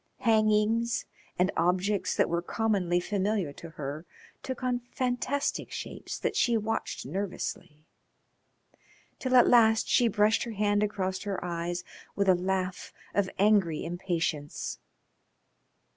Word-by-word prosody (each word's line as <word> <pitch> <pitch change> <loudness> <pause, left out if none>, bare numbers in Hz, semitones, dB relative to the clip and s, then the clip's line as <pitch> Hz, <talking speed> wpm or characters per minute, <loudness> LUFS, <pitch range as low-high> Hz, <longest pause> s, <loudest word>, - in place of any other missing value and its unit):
Hangings 220 +1 +2 0.3
and 180 +2 +2
objects 185 +4 +1
that - - +4
were 170 0 0
commonly 185 -3 0
familiar 195 -4 -1
to 165 - -10
her 150 +1 -6 0.3
took 260 -1 -5
on 250 -1 +1
fantastic 255 +2 -1
shapes - - -6
that - - -2
she 235 -2 +3
watched 225 +1 -3
nervously, 155 -2 -5 1.3
till 255 -1 0
at 245 - +7
last 225 -2 +5
she 245 - +4
brushed 210 0 +3
her 235 - -3
hand 205 0 +1
across 190 -3 -1
her 200 -3 -3
eyes 175 0 -3 0.3
with 200 -1 +1
a 190 - +7
laugh 185 0 -2 0.2
of 200 -2 +1
angry 195 -6 +3
impatience. 165 -4 -3
200 Hz, 125 wpm, -29 LUFS, 175-220 Hz, 1.3 s, at